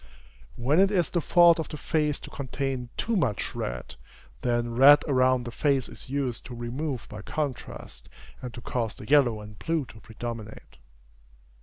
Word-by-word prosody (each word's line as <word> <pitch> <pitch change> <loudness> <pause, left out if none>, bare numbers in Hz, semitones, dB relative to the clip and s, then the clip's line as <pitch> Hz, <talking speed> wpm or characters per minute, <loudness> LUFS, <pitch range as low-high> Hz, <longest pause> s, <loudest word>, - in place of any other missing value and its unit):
When 140 +8 +2
it 195 0 +6
is 185 -5 +1
the 175 - +1
fault 170 0 +6
of 160 - -4
a 155 - -5
face 150 -2 0
to - - -10
contain 135 -2 -3
too 230 - 0
much 130 - 0
red, - - -5 0.4
then 120 -1 0
red 140 +4 +8
around 130 -2 +3
the 120 - -5
face 135 0 +1
is - - -9
used 135 -4 -2
to 125 - -8
remove 125 +3 -4
by 105 0 -8
contrast, 145 +3 -5 0.3
and 125 - -6
to 120 - -8
cause 115 -3 -2
the 105 - -10
yellow 130 -7 +4
and 105 0 -12
blue 165 -4 -1
to 110 - -14
predominate. 110 -1 -8
130 Hz, 170 wpm, -27 LUFS, 120-150 Hz, 0.4 s, red